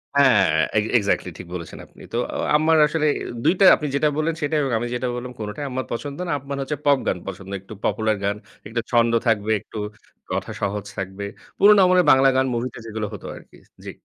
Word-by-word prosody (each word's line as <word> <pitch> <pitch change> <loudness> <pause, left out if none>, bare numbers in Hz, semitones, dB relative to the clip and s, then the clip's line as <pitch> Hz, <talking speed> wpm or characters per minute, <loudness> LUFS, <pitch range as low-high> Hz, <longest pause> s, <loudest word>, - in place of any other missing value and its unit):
হ্যাঁ, 125 -10 +5 0.3
egg 105 - +3
exactly 100 -3 0
ঠিক 90 - -9
বলেছেন 85 -3 -7
আপনি। - - -19
তো - - 0 0.2
আ - - -5 0.2
আম্মার 160 +1 +4
আসলে 155 0 0
অ্যা - - -6 0.2
২ - - +4
টা 195 - +6
আপনি 150 - -4
যেটা 150 +2 +3
বললেন 155 +1 0
সেটাই 150 +1 0
এবং 135 - -1
আমি 120 - -3
যেটা 125 +1 -2
বললাম 125 +1 -6
কোনটাই 105 +7 -5
আম্মার 130 -1 -3
পছন্দ 140 +4 -4
না। - - -2
আম্মার 140 +1 -6
হচ্ছে 145 +2 -3
পপ 140 -1 +5
গান - - +1
পছন্দ। 95 0 -7
একটু 95 - -11
পপুলার 110 -1 0
গান, 100 +1 0 0.3
একটু 115 +2 -2
ছন্দ 115 -1 +3
থাকবে, 110 -1 +1
একটু 110 - -11 0.5
কথা - - -3
সহজ 100 0 -2
থাকবে। 95 +1 -5 0.3
পুরোনো 205 +1 +7
আমাদের 180 0 +4
বাংলা 135 0 +6
গান 130 0 +3
মুভিতে 120 +1 -3
যেগুলো 110 -1 -4
হতো 105 - -9
আরকি। - - -15 0.3
জি। - - -5
125 Hz, 210 wpm, -22 LUFS, 105-145 Hz, 0.5 s, পুরোনো